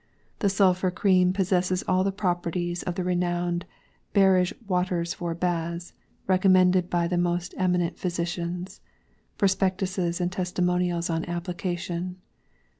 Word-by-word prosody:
The 200 - +2
Sulphur 190 -1 +3
Cream 185 0 +3
possesses 185 -1 +1
all 185 0 +3
the 195 - +1
properties 175 -2 -2
of 175 - -3
the 185 - -2
renowed 175 -1 -1 0.5
ŌĆ£Barege 190 -2 +4
Waters 180 -2 0
for 170 -1 -4
baths, 170 0 -2 0.3
ŌĆØŌĆörecommended 185 -1 +4
by 170 -1 +1
the 175 0 0
most 175 0 -1
eminent 180 -2 0
physicians. 175 0 -3 0.6
Prospectuses 190 -2 0
and 175 0 0
testimonials 180 -1 0
on 165 0 -1
application. 175 0 -3
180 Hz, 115 wpm, -26 LUFS, 175-185 Hz, 0.6 s, ŌĆ£Barege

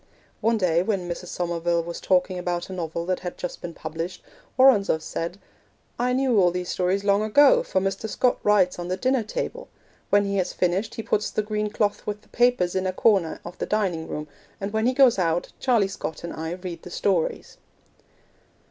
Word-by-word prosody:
One 230 0 +2
day 175 -4 +2
when 190 -2 -1
Mrs. 175 +1 -5
Somerville 170 -1 -1
was 170 0 -6
talking 185 0 +1
about 175 +1 -3
a - - -5
novel 170 -1 -4
that 185 0 -1
had 180 -1 -6
just 180 - -5
been 170 -2 -7
published, 165 +3 -5 0.3
Woronzow 240 -10 +5
said, 165 +3 -5 0.6
'I 250 +1 +1
knew 255 -4 +2
all 180 -2 +5
these 180 0 -4
stories 185 +2 0
long 200 0 +3
ago, 290 - +5
for 480 - 0
Mr. 195 +3 -2
Scott 250 +3 +1
writes 195 -4 +3
on 175 - -4
the 185 +1 -2
dinner 255 +4 +1
table; 215 - -4 0.4
when 205 0 +4
he 200 0 -1
has 185 - -1
finished 190 +5 0
he 225 - -5
puts 210 0 0
the 215 - -1
green 210 0 -2
cloth 205 -1 -1
with 210 0 -4
the - - -25
papers 240 -7 +2
in 190 0 0
a - - 0
corner 190 -5 +2
of 175 +1 -9
the - - -2
dining 185 -7 -1
room, 150 0 -5 0.3
and 200 +1 -4
when 220 +2 +1
he 255 - +2
goes 255 -6 +5
out 170 -1 0
Charlie 235 -7 +3
Scott 170 -5 -6
and 170 - -5
I 160 +1 -4
read 180 -2 -7
the - - -10
stories.' 180 -2 -1
190 Hz, 200 wpm, -25 LUFS, 175-215 Hz, 0.6 s, Woronzow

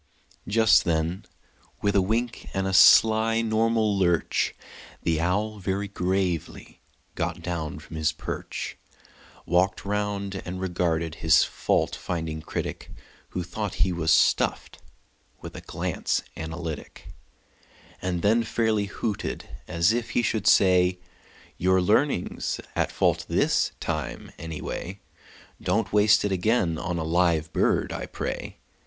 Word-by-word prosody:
Just 105 -7 +5
then, 85 +5 -1 0.6
with 100 -1 +2
a 100 - +5
wink 115 +5 -2
and 95 0 0
a 95 - -1
sly 110 +3 +6
normal 110 -1 +2
lurch, 85 -5 +1 0.5
The 80 -1 +1
owl, 105 +5 -1
very 100 +1 -2
gravely, 95 -3 -2 0.3
got 85 0 -3
down 80 -4 -3
from 80 +1 -9
his 80 0 +1
perch, 80 - -6 0.7
Walked 90 +4 +1
round, 100 -1 -2
and 90 +1 -6
regarded 85 -3 -1
his 80 -1 +5
fault - - 0
finding 80 -3 -4
critic - - -5 0.4
(Who 90 - -3
thought 100 +3 -4
he 95 - -1
was 85 -2 -1
stuffed) 80 - +2 0.6
with - - -9
a - - -7
glance - - -2
analytic, 80 -1 -6 0.9
And 90 -2 -2
then 110 +3 +4
fairly 110 -2 0
hooted, 100 +1 -4 0.2
as 85 +6 +2
if 120 0 -2
he 120 - +3
should 110 -3 0
say: 90 -1 +5 0.6
"Your 95 +1 +3
learning's 105 +3 0 0.2
at - - 0
fault - - +1
this - - +2
time, 75 -5 -4
anyway; 80 +4 -6 0.6
Don't 105 +5 0
waste 105 0 +5
it 100 - 0
again 90 -4 +1
on 85 +1 -3
a 80 - -2
live 80 -1 +1
bird, - - +1
I - - -5
pray. - - -5
95 Hz, 130 wpm, -26 LUFS, 85-105 Hz, 0.9 s, sly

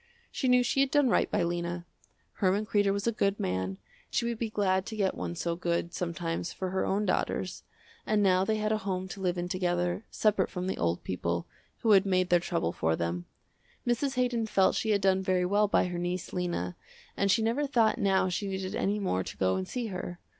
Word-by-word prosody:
She 265 - -1
knew 250 0 +5
she 245 - 0
had 275 0 +4
done 290 -2 +3
right - - +2
by - - +1
Lena. 175 0 -2 0.5
Herman 200 +2 +2
Kreder 205 -2 +2
was 200 +1 -2
a 235 - +3
good 200 -2 0
man, 95 +1 -2 0.3
she 235 - 0
would 235 -1 -2
be 230 - -1
glad 190 -3 +1
to 220 - -5
get 195 -3 +1
one 175 - -4
so 170 0 -2
good, 170 0 -1
sometimes, 170 -1 -3
for 185 -1 -4
her 190 - 0
own 205 +2 0
daughters, - - -1 0.4
and 215 -1 +2
now 185 -1 +4
they 215 +3 +1
had 215 0 0
a 215 - +1
home 190 -2 -3
to 195 - -7
live 180 -1 0
in 175 0 -2
together, 180 +1 -1
separate 210 -3 +2
from 180 0 -4
the 190 - -1
old 85 +1 0
people, 85 -1 -2 0.4
who 225 - +3
had 195 -1 +6
made 185 -1 +2
their 175 - +5
trouble 170 - -1
for 80 -1 0
them. 85 +1 -3 0.6
Mrs. 260 +3 0
Haydon 245 -3 +1
felt 195 -3 +3
she 220 - -1
had 205 -2 +3
done 190 -1 +3
very 185 -1 +1
well 205 +3 +3
by - - +3
her 180 -1 -3
niece, 175 0 -3
Lena, 175 - -2 0.4
and 200 - +1
she 210 +4 +3
never 250 +6 +1
thought 235 -4 +2
now 195 -3 +3
she 185 +3 -2
needed 190 -1 -3
any 200 +2 0
more 140 - 0
to - - -8
go 95 0 +2
and 95 0 -3
see 245 -2 -3
her. 180 -2 -5
190 Hz, 225 wpm, -29 LUFS, 175-215 Hz, 0.6 s, had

